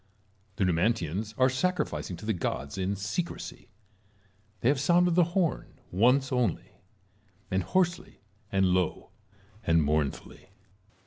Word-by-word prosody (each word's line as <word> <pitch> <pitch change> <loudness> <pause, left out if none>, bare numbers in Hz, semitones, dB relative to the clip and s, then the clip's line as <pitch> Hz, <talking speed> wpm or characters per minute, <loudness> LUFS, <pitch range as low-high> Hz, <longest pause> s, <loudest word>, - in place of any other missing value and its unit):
The 100 - 0
Numantians 95 +2 0
are 130 - +5
sacrificing 130 - -1
to - - -10
the 110 - +1
gods 70 -5 -3
in 95 +1 -1
secrecy; 105 - -5 0.9
they - - +1
have 140 -1 +2
sounded 175 +4 +3
the 175 0 +5
horn 180 -5 0 0.2
once 125 +8 +3
only, 125 -7 -1 0.3
— 100 0 -36
and 95 0 +1
hoarsely 175 - -1 0.3
and 95 0 +3
low 90 -1 -1 0.5
and 80 -1 +3
mournfully. 75 -1 -2
105 Hz, 125 wpm, -28 LUFS, 90-140 Hz, 0.9 s, are